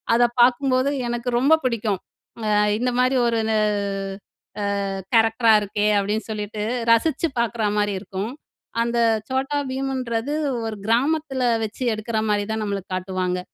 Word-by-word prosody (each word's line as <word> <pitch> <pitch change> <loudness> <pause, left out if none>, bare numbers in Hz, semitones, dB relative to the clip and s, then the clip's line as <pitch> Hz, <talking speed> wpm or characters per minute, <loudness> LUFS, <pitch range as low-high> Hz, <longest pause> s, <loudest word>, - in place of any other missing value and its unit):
அத 240 - +4 0.2
பார்க்கும்போது 255 +2 +3 0.2
எனக்கு 240 +1 -2
ரொம்ப 285 +5 +4
பிடிக்கும். 215 -5 0 0.4
அ - - 0 0.3
"இந்த 250 +2 0
மாரி 255 +1 +3
ஒரு 230 -1 +1
ந - - +2 1.3
அ - - -2 0.3
கேரக்டரா 225 0 +4
இருக்கே!" 205 +1 -1
அப்படின்னு 210 +2 -1
சொல்லிட்டு 210 0 -4 0.3
ரசிச்சு 310 +7 +2
பார்க்குறா 230 -2 0
மாரி 205 -1 +1
இருக்கும். 195 +3 -5 0.5
அந்த 235 0 -1 0.3
Chhota 270 +2 -1
Bheemன்றது 260 -1 -2 0.3
ஒரு 220 -1 -4
கிராமத்துல 270 +3 +1 0.2
வச்சு 220 +4 -6
எடுக்குற 220 +1 -2
மாரிதான் 210 +1 0
நம்மளுக்கு 200 -2 -4
காட்டுவாங்க. 185 -1 -2
230 Hz, 130 wpm, -23 LUFS, 210-255 Hz, 1.3 s, அத